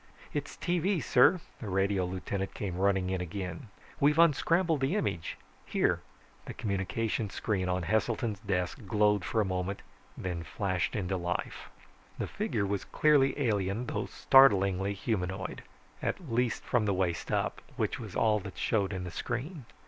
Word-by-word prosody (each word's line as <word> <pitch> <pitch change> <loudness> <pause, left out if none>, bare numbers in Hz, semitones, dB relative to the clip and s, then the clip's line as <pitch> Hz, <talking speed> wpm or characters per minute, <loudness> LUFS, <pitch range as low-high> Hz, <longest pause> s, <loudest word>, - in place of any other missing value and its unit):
"It's 145 -1 -4
tv, 180 +2 +1
sir!" 150 +8 +5 0.2
The 110 - -5
radio 95 0 +1
lieutenant 95 +2 -4
came 95 -4 -3
running 95 -1 +2
in 95 -1 -1
again. 90 +2 -5 0.3
"We've 150 +2 +4
unscrambled 165 0 +4
the 135 +8 +1
image. 85 - -2 0.3
Here!" - - +1 0.4
The - - -7
communications 105 +1 -2
screen 95 -4 -1
on 90 0 0
Heselton's 110 +1 0
desk 100 +3 -2
glowed 105 -1 +3
for 110 - +1
a - - +1
moment, 95 +1 -2 0.3
then 90 -2 -3
flashed 95 +1 -2
into 95 -2 -1
life. 90 0 -3 0.5
The - - -2
figure 100 - -1
was 100 0 -1
clearly 145 -2 +3
alien, 105 -2 0
though - - -3
startlingly 100 -6 +5
humanoid 95 -2 -3 0.4
at 160 -9 -3
least 120 -1 +1
from 120 -3 +1
the 100 - +2
waist 90 -3 -1
up, - - 0
which - - -1
was - - -8
all 110 -1 +3
that 100 -1 -9
showed 100 -3 +1
in 95 -1 -3
the 90 - -5
screen. 130 - -4
100 Hz, 155 wpm, -30 LUFS, 95-125 Hz, 0.5 s, sir